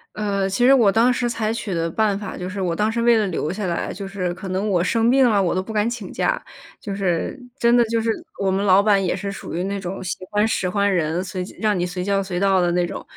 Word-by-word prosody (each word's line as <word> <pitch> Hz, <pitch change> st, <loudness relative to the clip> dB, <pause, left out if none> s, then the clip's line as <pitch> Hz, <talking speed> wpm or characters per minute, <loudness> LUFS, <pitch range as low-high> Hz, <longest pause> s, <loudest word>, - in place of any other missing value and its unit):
呃， 200 Hz, -2 st, -1 dB
其 195 Hz, +5 st, 0 dB
实 255 Hz, -, +7 dB
我 225 Hz, -6 st, +4 dB
当 230 Hz, +4 st, +4 dB
时 245 Hz, 0 st, 0 dB
采 225 Hz, -2 st, -1 dB
取 225 Hz, -4 st, -4 dB
的 165 Hz, 0 st, -1 dB
办 205 Hz, +3 st, +1 dB
法 205 Hz, -1 st, -6 dB
就 180 Hz, -, -5 dB
是 195 Hz, +1 st, -5 dB
我 175 Hz, -2 st, -1 dB
当 210 Hz, +4 st, +1 dB
时 235 Hz, +1 st, -1 dB
为 235 Hz, 0 st, +5 dB
了 215 Hz, -, +2 dB
留 165 Hz, -3 st, -2 dB
下 205 Hz, +2 st, -4 dB
来， 170 Hz, -2 st, -2 dB
就 195 Hz, +1 st, -6 dB
是 190 Hz, -2 st, -3 dB
可 190 Hz, -, -7 dB
能 190 Hz, +3 st, -1 dB
我 180 Hz, -3 st, +2 dB
生 230 Hz, +5 st, +2 dB
病 265 Hz, 0 st, +5 dB
了， 210 Hz, -4 st, +3 dB
我 180 Hz, -2 st, 0 dB
都 185 Hz, -, +1 dB
不 220 Hz, +3 st, -7 dB
敢 210 Hz, +2 st, +1 dB
请 230 Hz, -6 st, -6 dB
假。 -, -, 0 dB, 0.4 s
就 200 Hz, -, -5 dB
是 190 Hz, +1 st, -1 dB, 0.2 s
真 235 Hz, -2 st, +3 dB
的 240 Hz, -, +5 dB
就 230 Hz, 0 st, 0 dB
是 225 Hz, 0 st, 0 dB, 0.3 s
我 195 Hz, -1 st, +1 dB
们 195 Hz, +1 st, 0 dB
老 195 Hz, -1 st, +5 dB
板 200 Hz, -2 st, +3 dB
也 180 Hz, -, 0 dB
是 200 Hz, +1 st, -4 dB
属 195 Hz, -, -7 dB
于 175 Hz, -, -1 dB
那 200 Hz, +1 st, -3 dB
种 190 Hz, 0 st, -5 dB
喜 180 Hz, -, -3 dB
欢 210 Hz, +1 st, +2 dB
使 185 Hz, -4 st, -1 dB
唤 200 Hz, +1 st, +1 dB
人， 170 Hz, +1 st, 0 dB
随 185 Hz, -1 st, -4 dB
叫 180 Hz, -, -11 dB
让 210 Hz, -3 st, +1 dB
你 -, -, 0 dB
随 180 Hz, 0 st, -3 dB
叫 195 Hz, +1 st, +1 dB
随 190 Hz, -2 st, -3 dB
到 195 Hz, -1 st, +3 dB
的 175 Hz, -1 st, +1 dB
那 175 Hz, 0 st, +2 dB
种。 -, -, -6 dB
195 Hz, 305 characters per minute, -22 LUFS, 185-220 Hz, 0.4 s, 实